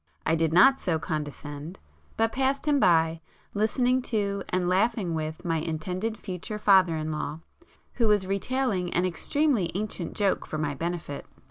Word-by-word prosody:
I 160 - +2
did 165 -1 +1
not 265 +11 +6
so 165 -3 0
condescend,—but 155 +8 -5
passed 270 +3 0
him 290 -1 +3
by, 165 -5 +3 0.3
listening 245 +5 +2
to, 200 -3 0
and 180 -1 0
laughing 190 -1 +1
with 155 +2 -4
my 165 -1 +1
intended 180 +8 -3
future 195 +1 -6
father 190 -5 +5
in 155 0 -3
law, 150 +1 -4 0.6
who 230 - +5
was 205 -2 +3
retailing 195 -2 -1
an 175 - +2
extremely 240 - +1
ancient 195 -4 -3
joke 200 -2 0
for 155 - -4
my 150 -2 -1
benefit. 165 -1 -4
185 Hz, 150 wpm, -27 LUFS, 160-215 Hz, 0.6 s, not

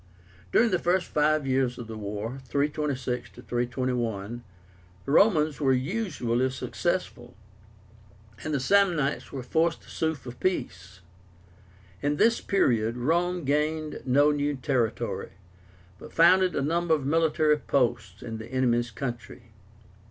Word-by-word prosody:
During 230 0 +4
the 180 - +2
first 175 +1 +1
five 150 -1 +2
years 130 -2 0
of 120 - -7
the 110 0 -8
war 105 +4 -5
(326 140 -3 -2 0.2
321), 120 -3 -2 0.6
the 140 - -3
Romans 155 -5 +4
were 135 -2 +3
usually 130 - -1
successful, 130 -2 -3 1.1
and 155 - -3
the 145 - 0
Samnites 170 -2 +2
were 135 -3 -5
forced 165 +5 0
to - - -15
sue 160 0 -1
for 130 -4 -9
peace. 95 - -3 1.0
In 145 +1 0
this 230 +9 +3
period 115 - +1
Rome 175 +7 0
gained 150 +2 -1
no 145 +3 +4
new 145 0 -1
territory, 125 -4 -2 0.7
but - - -11
founded 180 +1 +5
a 140 - 0
number 165 +2 +2
of 145 -4 -5
military 155 0 +2
posts 110 -9 -1
in 115 -1 -6
the 110 - -8
enemy's 120 -2 +1
country. 120 -1 -7
140 Hz, 130 wpm, -27 LUFS, 120-160 Hz, 1.1 s, founded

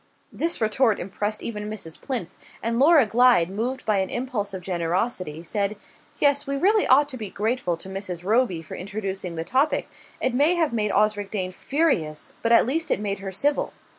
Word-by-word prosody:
This 335 +1 0
retort 220 0 +2
impressed 205 +3 -3
even 210 -2 -4
Mrs. 185 -7 -7
Plinth, 235 - -3 0.3
and 230 +1 0
Laura 295 -1 +6
Glyde, 230 -6 +4
moved 245 +6 -3
by 210 -3 +2
an 190 - -1
impulse 240 -5 -3
of 190 -2 -7
generosity, 175 -1 -2
said: 200 +4 -2 0.4
"Yes, 285 0 +2
we 275 0 -1
really 410 +7 +3
ought 285 +3 +5
to 260 - -4
be 215 -4 -6
grateful 210 -4 -1
to 170 - -11
Mrs. 190 -3 -5
Roby 205 -5 +1
for 155 - -10
introducing 190 -2 -5
the 160 - -3
topic. 270 - +1 0.3
It 255 - 0
may 295 +7 +3
have 320 -6 +1
made 210 -2 0
Osric 205 -1 +1
Dane 185 -3 -2
furious, 185 - -1
but 230 - 0
at 235 - +6
least 315 +7 -1
it - - +1
made 200 -1 -2
her 195 -1 -5
civil." 285 +10 +1
215 Hz, 190 wpm, -24 LUFS, 190-260 Hz, 0.4 s, Laura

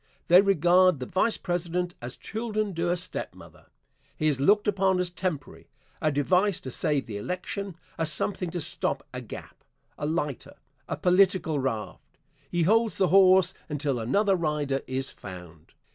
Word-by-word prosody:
They 180 +2 +8
regard 185 -3 +4
the 125 - -4
Vice 205 - +1
President 175 0 -2
as 120 +1 -6
children 215 -2 -3
do 170 +1 -1
a 175 - +1
stepmother. 185 +1 -7 0.5
He 155 - -2
is 145 -4 +1
looked 205 +8 +4
upon 190 -2 +2
as 180 -1 -1
temporary 175 -6 -4 0.3
a 155 - +2
device 180 +7 +2
to 130 - -7
save 145 0 0
the 105 -3 -6
election 180 - -4 0.2
a 165 - +1
something 180 +3 -1
to 175 0 -4
stop - - -2
a - - -5
gap - - -10 0.4
a 145 - -2
lighter 150 -4 -3 0.3
a 145 - -2
political 180 -3 +3
raft. 130 -5 -5 0.3
He 175 -1 0
holds 225 +5 +3
the 190 -3 +2
horse 185 0 +6 0.2
until 145 -4 -1
another 195 - +2
rider 150 -5 -1
is 130 +1 -2
found. 90 -4 -12
175 Hz, 160 wpm, -27 LUFS, 145-190 Hz, 0.5 s, They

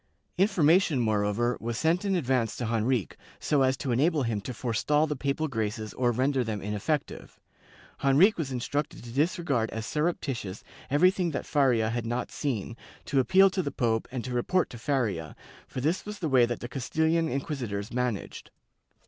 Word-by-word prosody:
Information, 175 -5 +4
moreover, 110 +1 +1
was 115 0 -3
sent 165 +3 +1
in 195 -2 +1
advance 125 - 0
to 120 - -3
Henrique, 115 -2 0 0.2
so 145 -2 +1
as 130 0 +2
to 135 -3 -3
enable 145 +4 +2
him 115 -4 -1
to 100 - -5
forestall 125 +6 +1
the 150 -1 -3
papal 140 +3 -1
graces 110 -4 -3
or 125 -1 +1
render 130 +2 +1
them 110 -3 -3
ineffective. 105 +9 -3 0.6
Henrique 160 +10 +5
was 140 -5 -2
instructed 140 +3 -3
to 120 - -9
disregard 140 -4 0
as 110 0 -5
surreptitious 135 - -2 0.3
everything 180 +5 +3
that 145 - -4
Faria 125 -7 +2
had 115 -1 -3
not 120 +1 -2
seen, 115 -6 -3 0.3
to 140 - +1
appeal 190 +10 +5
to 185 +1 0
the 145 - -2
pope 115 -4 0
and 125 -2 -4
to 125 - -4
report 170 +9 +1
to 120 - -9
Faria, 110 - -1 0.3
for 130 - -5
this 160 +7 0
was 210 0 -7
the 175 - -2
way 125 -3 +5
that 120 - -4
the 120 - -4
Castilian 160 +6 0
inquisitors 125 -7 -3
managed. 125 -4 -3
130 Hz, 175 wpm, -28 LUFS, 115-155 Hz, 0.6 s, Henrique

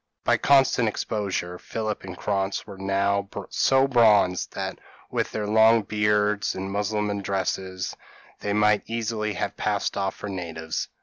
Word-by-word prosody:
By - - +3
constant 135 -4 +4
exposure 95 -4 -3
Philip 110 -1 -4
and 90 -2 -8
Krantz 100 -1 -1
were 100 -2 -10
now 100 +1 0 0.2
so 135 0 +3
bronzed 105 -8 +4
that - - -4 0.3
with - - -1
their 105 - -2
long 110 +1 +5
beards 105 0 +1
and 95 +1 -4
Mussulman 105 0 -1
dresses, 95 -1 -2 0.4
they 100 - -3
might 105 0 +3
easily 110 -2 -2
have - - -3
passed - - -1
off 95 -1 -1
for - - -7
natives. 80 -4 -4
105 Hz, 140 wpm, -25 LUFS, 95-110 Hz, 0.4 s, long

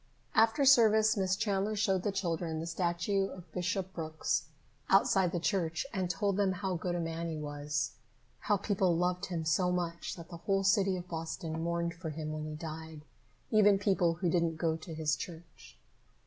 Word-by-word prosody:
After 230 +6 +4
service, 220 -4 +6
Miss 190 -2 +1
Chandler 205 0 0
showed 195 -3 +1
the 205 - -1
children 170 -4 -2
the 160 - -4
statue 175 +3 0
of 180 -4 -11
Bishop 185 +2 -2
Brooks 160 -3 -1 0.4
outside 195 -2 +4
the 175 - -1
church 170 -1 0
and 185 -3 -1
told 195 +3 0
them 195 -2 +2
how 190 0 -2
good 175 +1 -2
a - - -1
man 165 0 -3
he 160 - -4
was, 145 0 -2
and 125 - -31 0.5
how 205 - +4
people 190 -3 +1
loved 180 +1 0
him 170 -3 -3
so 180 +3 +2
much 170 -2 -2
that 170 -2 -11
the 170 - -7
whole 195 +3 0
city 195 -1 +3
of 175 0 -7
Boston 160 -1 -4
mourned 170 0 -1
for 165 -1 -6
him 155 0 -4
when 155 0 -4
he 155 - -5
died, 160 0 -7 0.5
even 205 -2 +6
people 190 -4 +2
who 175 +1 0
didn't 170 -2 +1
go 160 0 +1
to 160 0 -8
his 155 -1 +1
church. 170 -1 -10
175 Hz, 190 wpm, -32 LUFS, 165-195 Hz, 0.5 s, service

